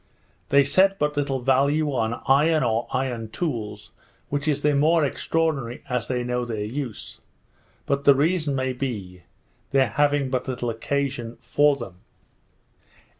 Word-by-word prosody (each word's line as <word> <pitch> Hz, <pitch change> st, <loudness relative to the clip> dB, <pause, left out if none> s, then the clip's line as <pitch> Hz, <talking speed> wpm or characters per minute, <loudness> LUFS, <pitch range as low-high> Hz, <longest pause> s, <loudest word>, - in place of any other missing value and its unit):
They 140 Hz, 0 st, +5 dB
set 190 Hz, +7 st, +3 dB
but 150 Hz, -3 st, 0 dB
little 140 Hz, -2 st, -1 dB
value 140 Hz, +3 st, +2 dB
on 115 Hz, -2 st, -2 dB
iron 150 Hz, +3 st, +4 dB
or 115 Hz, -1 st, 0 dB
iron 125 Hz, -4 st, -2 dB
tools, 110 Hz, -8 st, -4 dB, 0.4 s
which 145 Hz, +1 st, -2 dB
is 145 Hz, -1 st, 0 dB
the 150 Hz, 0 st, +3 dB
more 155 Hz, +2 st, +3 dB
extraordinary, 140 Hz, -4 st, -1 dB
as 125 Hz, -2 st, -1 dB
they 125 Hz, -1 st, -1 dB
know 125 Hz, 0 st, -1 dB
their 110 Hz, -3 st, -3 dB
use; 125 Hz, 0 st, -6 dB, 0.6 s
but 140 Hz, 0 st, -1 dB
the 140 Hz, -1 st, +7 dB
reason 155 Hz, 0 st, +1 dB
may 130 Hz, -1 st, -1 dB
be, 105 Hz, -9 st, -5 dB, 0.5 s
their 135 Hz, -3 st, +3 dB
having 145 Hz, +2 st, +1 dB
but 130 Hz, 0 st, -1 dB
little 125 Hz, -2 st, -2 dB
occasion 125 Hz, 0 st, -3 dB
for 145 Hz, +4 st, +3 dB
them. 100 Hz, -9 st, -9 dB
135 Hz, 145 wpm, -24 LUFS, 120-145 Hz, 0.6 s, the